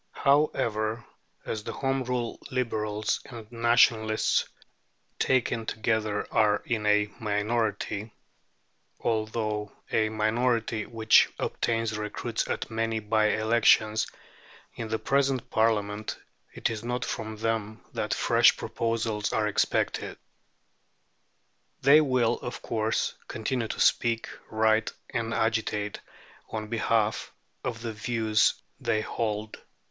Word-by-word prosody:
However, 115 -6 +1 0.4
as 110 -1 -3
the - - -5
Home 135 -1 -1
Rule 125 -2 -2
Liberals 110 -5 -1
and 115 -3 -10
Nationalists, 115 -2 +3 0.7
taken 120 -3 +1
together, 110 -1 -1
are 105 -2 +3
in 110 -3 -1
a 105 0 +3
minority 105 0 -1 0.9
(although 110 -2 -1 0.2
a 110 -1 +2
minority 110 0 0
which 110 -2 +5
obtains 115 -1 -1
recruits 105 -1 -3
at - - -3
many 115 0 -1
bye 110 0 +2
elections) 110 0 +3 0.7
in 115 - -5
the 110 0 -1
present 135 0 0
Parliament, 110 -1 0 0.3
it - - -1
is 110 -1 -5
not 120 +1 -2
from 110 -1 -4
them 110 -1 -2
that - - -2
fresh - - +4
proposals 115 -2 -1
are 110 -1 +1
expected. 105 - 0 1.7
They 140 +3 +8
will, 125 -5 +2
of 120 - -6
course, 110 -1 0
continue 115 +1 -2
to - - -5
speak, 115 -1 +2 0.2
write, 110 0 +2 0.2
and 115 -1 -2
agitate 110 -2 -1 0.5
on 110 -1 -5
behalf 110 -1 0 0.3
of 115 -1 -4
the 115 -1 -3
views 110 0 +2 0.2
they 110 - 0
hold. 110 -1 -3
110 Hz, 110 wpm, -27 LUFS, 110-115 Hz, 1.7 s, They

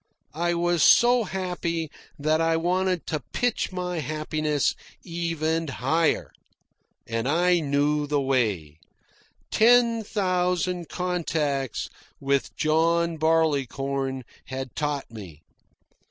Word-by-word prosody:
I 175 +3 0
was 175 -1 +1
so 240 +7 +6
happy 175 -4 -3 0.3
that 155 +2 +1
I 165 0 +2
wanted 180 +1 0
to 155 - -2
pitch 245 -5 0
my 180 -2 -3
happiness 155 0 -1 0.3
even 165 -2 -2
higher. 150 +5 0 0.7
And 115 +1 -2
I 175 +4 +3
knew 145 0 +1
the 145 0 +1
way. 105 - -1 0.7
Ten 230 0 +4
thousand 180 -3 -1
contacts 155 - -2 0.3
with 140 0 -1
John 165 +2 +1
Barleycorn 140 -4 0 0.2
had 130 -1 -6
taught 145 -4 -2
me. 90 -9 -11
160 Hz, 100 wpm, -25 LUFS, 140-175 Hz, 0.7 s, so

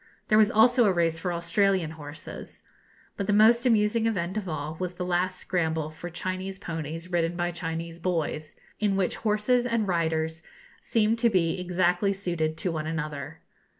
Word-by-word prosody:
There 215 - +5
was 215 -1 +6
also 240 +2 +5
a 200 - +4
race 165 -2 +1
for 180 - -2
Australian 170 0 +1
horses. 150 -1 -9 0.5
But 200 - -2
the 205 - +2
most 230 +4 +5
amusing 225 0 +3
event 185 -4 -1
of 205 -4 -3
all 155 0 -4
was 180 -1 -3
the 180 - -3
last 180 +1 0
scramble 160 -4 -1
for 175 +3 -8
Chinese 185 +2 -4
ponies 165 +1 -6
ridden 170 -1 +1
by 175 0 -1
Chinese 165 0 -5
boys, 160 -3 -2 0.2
in 205 -2 +1
which 190 -2 0
horses 225 +3 +2
and 230 -4 0
riders 160 -2 0 0.4
seemed 225 0 +1
to 235 0 +4
be 185 -3 +1
exactly 180 +2 +1
suited 170 -5 -2
to 180 - -1
one 155 -1 -3
another. 155 -1 -5
180 Hz, 170 wpm, -27 LUFS, 165-205 Hz, 0.5 s, was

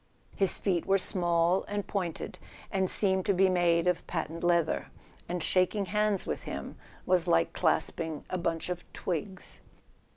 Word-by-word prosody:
His 195 -2 +3
feet 180 -5 -1
were 195 - +4
small 175 -1 +2
and 205 -1 -3
pointed, 180 -5 -4 0.3
and 190 -1 +1
seemed 190 -2 +2
to 200 - +3
be 190 +1 +4
made 175 -2 +3
of 180 -1 0
patent 165 0 -4
leather; 170 -2 +2 0.4
and 175 -1 -2
shaking 190 +2 +1
hands 210 +1 +1
with - - -3
him - - -6 0.3
was 180 -1 +3
like 85 - +2
clasping 160 -2 -1
a 185 - -3
bunch 170 0 -2
of 175 -1 -4
twigs. 185 +2 -4
180 Hz, 155 wpm, -29 LUFS, 170-190 Hz, 0.4 s, were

